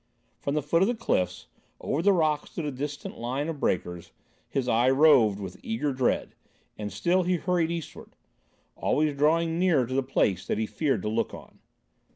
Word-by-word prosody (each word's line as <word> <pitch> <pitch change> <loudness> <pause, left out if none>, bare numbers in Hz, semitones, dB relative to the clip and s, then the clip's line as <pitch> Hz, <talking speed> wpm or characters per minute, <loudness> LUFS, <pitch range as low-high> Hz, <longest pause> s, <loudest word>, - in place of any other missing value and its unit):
From 140 - -2
the 150 - 0
foot 165 +4 +2
of 190 - +4
the 240 - 0
cliffs, 90 - -1 0.3
over 145 - -1
the 200 - +4
rocks 155 -5 +1
to 170 - -3
the 150 - -2
distant 145 +2 -6
line 130 +6 -2
of 160 -3 -4
breakers, 90 -4 -2 0.4
his 130 -2 -1
eye 120 +2 +3
roved 135 -8 +5
with 95 -2 -7
eager 225 - -2
dread, 130 -1 0 0.4
and 105 -1 -5
still 175 - +1
he 180 0 +1
hurried 175 -1 0
eastward, 170 -3 -7 0.6
always 150 -1 0
drawing 165 +3 +2
nearer 170 -9 +3
to 130 - -6
the 135 - +2
place 130 -7 0
that - - -1
he 110 - 0
feared 135 - -1
to - - -2
look 110 +1 -1
on. - - -14
145 Hz, 190 wpm, -27 LUFS, 115-165 Hz, 0.6 s, roved